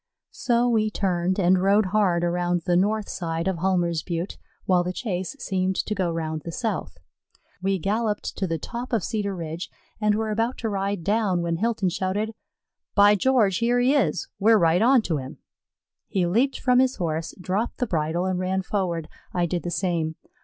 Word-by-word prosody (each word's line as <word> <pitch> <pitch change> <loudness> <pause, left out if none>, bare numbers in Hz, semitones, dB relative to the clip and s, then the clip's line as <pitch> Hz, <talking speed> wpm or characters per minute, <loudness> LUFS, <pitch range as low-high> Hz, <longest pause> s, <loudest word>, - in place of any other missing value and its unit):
So 240 0 +1
we 220 -3 +2
turned 185 -2 0
and 180 0 +4
rode 200 +1 +3
hard 185 -5 +3
around 175 0 0
the 175 - +2
north 210 +3 +1
side 165 -1 -3
of 190 -2 0
Hulmer's 175 -3 +1
Butte, 170 +3 -4 0.3
while 180 -2 +3
the 180 - -2
chase 190 +2 -3
seemed 190 -5 -1
to 210 - -1
go 190 -4 0
round 160 -2 -3
the 170 - -5
south. 195 - -3 0.6
We 195 +1 +1
galloped 210 +4 -1
to 190 - 0
the 165 -1 -1
top 240 - -6
of 220 -5 +1
Cedar 200 -3 -2
Ridge 165 0 -5 0.3
and 210 -1 +2
were 220 0 -1
about 225 +4 0
to 225 - -2
ride 195 -2 -2
down, 200 -3 +1
when 170 -1 -1
Hilton 215 -1 0
shouted, 195 +4 -2 0.6
"By 205 0 +7
George, 210 -3 +3
here 240 +1 +2
he 250 +3 +3
is! 190 - +1
We're 220 +2 +5
right 170 -1 +3
onto 225 - +3
him." 135 +2 -7 0.7
He 190 -4 0
leaped 235 +10 +1
from 250 -1 +3
his 260 0 +3
Horse, 165 -2 -3
dropped 190 +6 -2
the 250 - 0
bridle, 165 -2 -1
and 185 -1 -1
ran 190 +1 -1
forward. 175 -5 -2 0.3
I 175 -1 +2
did 175 0 -2
the 175 - -4
same. 170 -3 -1
190 Hz, 185 wpm, -25 LUFS, 175-215 Hz, 0.7 s, By